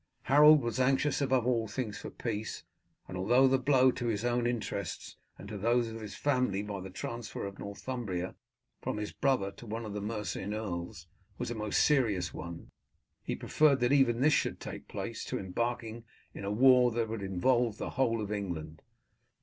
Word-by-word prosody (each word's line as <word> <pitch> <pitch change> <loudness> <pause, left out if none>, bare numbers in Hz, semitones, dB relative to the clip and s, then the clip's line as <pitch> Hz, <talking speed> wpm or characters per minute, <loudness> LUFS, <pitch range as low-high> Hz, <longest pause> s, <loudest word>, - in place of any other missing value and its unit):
Harold 150 +1 +7
was 120 +1 -2
anxious 135 +3 +2
above 130 -3 +2
all 115 -3 +1
things 115 -5 -4
for - - -7
peace, 110 -2 -4 0.4
and 90 - -7
although 120 +9 +4
the 135 0 +3
blow 130 -1 +4
to 120 -1 -4
his 110 0 -1
own 120 0 +1
interests 120 -2 -4 0.2
and 100 - -10
to 105 -1 -6
those 120 +2 +2
of 115 0 -7
his 105 -2 -7
family, 125 -8 +1
by 100 -2 -5
the 95 - -7
transfer 115 +5 -5
of 100 0 -7
Northumbria 100 -3 -4 0.5
from - - -3
his 105 0 -4
brother 125 -8 +1
to 120 - -13
one 110 +2 -4
of 105 - -6
the 105 - -3
Mercian 105 -1 -3
earls, 90 -6 -5 0.3
was - - -3
a - - -1
most 105 -2 +1
serious 110 - +2
one, 85 -1 -8 0.5
he - - -3
preferred 150 -3 +3
that 125 +3 +3
even 125 -4 +4
this 150 +2 +5
should - - 0
take - - -8
place - - -5
to - - -3
embarking 115 +4 -3 0.3
in - - -8
a 100 - -1
war 125 +2 +6
that 115 -1 -1
would 110 -1 -4
involve 110 +4 +1
the - - -4
whole 115 -4 +1
of 105 -1 -4
England. 80 -7 -4
115 Hz, 190 wpm, -31 LUFS, 100-125 Hz, 0.5 s, Harold